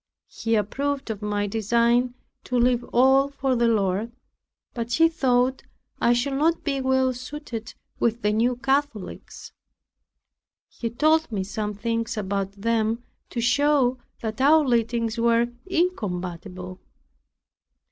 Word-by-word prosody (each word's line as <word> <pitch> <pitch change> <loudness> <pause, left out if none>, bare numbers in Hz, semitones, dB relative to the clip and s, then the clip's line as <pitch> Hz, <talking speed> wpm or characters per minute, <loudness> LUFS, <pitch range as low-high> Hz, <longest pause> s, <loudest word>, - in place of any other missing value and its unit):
He 225 0 -1
approved 270 +5 -1
of 210 -1 -6
my 205 0 -1
design 235 +4 +1 0.3
to 250 - -1
leave 245 0 +3
all 265 +3 +4
for 270 -2 -1
the 235 0 +2
Lord; 210 0 +1 0.6
but 235 0 -4
he 330 +4 +5
thought 260 -5 +1 0.4
I 235 - +4
should 240 +3 +1
not 315 +5 +1
be 275 -3 -1
well 260 0 +2
suited 250 -3 -7 0.2
with 235 0 0
the 210 0 +2
New 240 +3 +2
Catholics. 270 -4 -3 1.2
He 230 - -5
told 310 +5 +2
me 200 -3 -1
some 210 +1 -4
things 230 +2 -2
about 195 -1 -2
them, 225 +2 0 0.3
to 235 - -3
show 255 0 +2 0.2
that 220 +2 -4
our 305 +2 +5
leadings 230 -1 0
were 235 0 +3 0.2
incompatible. 185 - -3
235 Hz, 125 wpm, -24 LUFS, 220-265 Hz, 1.2 s, he